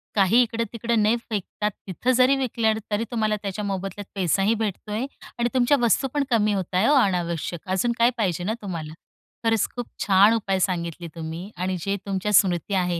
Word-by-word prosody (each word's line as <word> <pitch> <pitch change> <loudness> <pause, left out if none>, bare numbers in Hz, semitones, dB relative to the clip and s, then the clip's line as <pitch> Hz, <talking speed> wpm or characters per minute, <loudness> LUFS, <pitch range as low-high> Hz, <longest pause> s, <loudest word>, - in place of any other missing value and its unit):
काही 205 +4 +5
इकडं-तिकडं 230 0 -1
नाही 215 +3 +4
फेकतात, 210 0 -2 0.2
तिथं 215 +7 0
जरी 255 +2 +5
विकल्या 230 -4 +1
ना, 220 - -4
तरी 210 +2 +1
तुम्हाला 215 -3 +1
त्याच्या 200 +1 -3
मोबदल्यात 195 0 -4
पैसाही 195 +3 +2
भेटतो 215 -1 -4
आहे 220 +5 -1 0.3
आणि 240 0 +1
तुमच्या 260 +2 +3
वस्तू 240 +3 +3
पण 290 -1 +1
कमी 215 -3 +2
होत 190 -2 -3
आहे 190 +5 +3
ओ 295 - +5
अनावश्यक, 175 -4 -1
अजून 190 +6 +1
काय 235 - +6
पाहिजे 180 -6 0
ना 210 +5 -1
तुम्हाला. 165 -6 -5 0.5
खरंच, 225 -2 +2
खूप 245 -1 -4 0.2
छान 195 +2 +5
उपाय 195 -4 0
सांगितले 170 -2 -2
तुम्ही 165 +4 -6
आणि 185 +1 -1
जे 200 +4 -1
तुमच्या 195 +1 -2
स्मृती 185 0 +3
आहे. 180 -3 +1
205 Hz, 185 wpm, -24 LUFS, 185-230 Hz, 0.5 s, काय